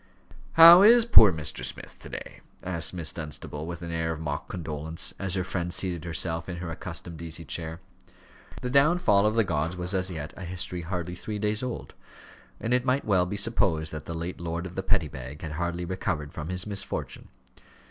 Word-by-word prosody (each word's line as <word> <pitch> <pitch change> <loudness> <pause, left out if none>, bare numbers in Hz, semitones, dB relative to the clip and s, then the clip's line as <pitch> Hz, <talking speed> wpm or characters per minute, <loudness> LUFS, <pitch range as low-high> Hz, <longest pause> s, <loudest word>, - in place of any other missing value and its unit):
"How 170 +2 +11
is 230 +3 +7
poor 110 - +8
Mr. 80 -3 -3
Smith - - -7
to - - -11
day?" - - -8 0.2
asked 85 -3 0
Miss 85 -4 -2
Dunstable, 75 -1 -6
with 85 0 -6
an 85 - -5
air 80 0 -1
of 80 - -5
mock 75 -2 -4
condolence, 80 -2 -3
as 95 -2 0
her 95 - 0
friend 90 -1 -3
seated 90 -3 -2
herself 80 0 -1
in 90 - -5
her 85 -1 -5
accustomed 85 -1 -7
easy 80 0 -6
chair. 80 +1 -4 0.8
The 125 - -2
downfall 140 - +4
of 110 - 0
the 115 - +4
gods 85 -1 -2
was 90 +2 +1
as 95 0 +1
yet 80 -4 -6
a 95 - -8
history 90 0 -2
hardly 90 0 -4
three 105 +4 -5
days 105 +1 -1
old, 125 -2 -5 0.7
and 115 - -1
it 125 0 +2
might 130 +2 +1
well 95 -4 +3
be 100 - -4
supposed 95 -8 +1
that 75 - -7
the 85 - -5
late 85 +2 -5
lord 85 +1 -3
of 90 - -7
the 95 - -3
Petty 95 -4 +1
Bag 65 +2 -9
had 80 - -4
hardly 85 +2 -3
recovered 75 -5 -3
from 80 +1 -6
his 90 0 -2
misfortune. 100 -2 -4
90 Hz, 200 wpm, -27 LUFS, 80-100 Hz, 0.8 s, How